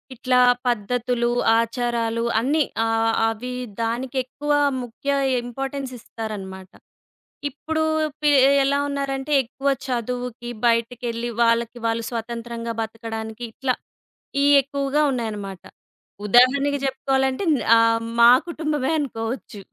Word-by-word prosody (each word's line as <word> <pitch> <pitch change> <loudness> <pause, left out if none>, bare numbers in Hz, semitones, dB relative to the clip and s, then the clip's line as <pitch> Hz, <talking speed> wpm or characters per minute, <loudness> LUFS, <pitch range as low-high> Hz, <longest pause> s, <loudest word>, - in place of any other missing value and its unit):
ఇట్లా 250 +1 +2 0.3
పద్ధతులు, 240 +1 0 0.3
ఆచారాలు 230 -1 -1 0.2
అన్నీ 290 +6 +2 0.2
ఆహ్, 225 0 +1 0.2
అవి 240 +3 -5 0.3
దానికెక్కువ 255 +4 -2 0.3
ముఖ్య 245 +4 -7 0.3
ఇంపార్టెన్స్ 270 +2 -5
ఇస్తారన్నమాట. 195 -5 -7 0.8
ఇప్పుడు 315 +3 -3 0.4
పి 300 -1 +4 0.3
ఎలా 280 +1 +2
ఉన్నారంటే, 275 0 -2
ఎక్కువ 270 +3 -6 0.2
చదువుకి, 245 -1 -3 0.2
బయటికెళ్ళి 235 0 -1
వాళ్ళకి 235 +1 +1
వాళ్ళు 225 0 -1
స్వతంత్రంగా 235 0 -4
బతకడానికి 225 0 -6
ఇట్లా 255 +2 -1 0.7
ఇయి 285 0 +5
ఎక్కువగా 280 +2 -1
ఉన్నాయన్నమాట. 210 -6 -4 0.6
ఉదాహరణకి 275 +6 +4
జెప్పుకోవాలంటే 265 +2 0
న్ - - -1 0.2
ఆహ్, 230 0 +3 0.2
మా 235 +1 +9 0.2
కుటుంబమే 305 -5 -1
అనుకోవచ్చు. 230 -5 -4
240 Hz, 95 wpm, -23 LUFS, 230-270 Hz, 0.8 s, మా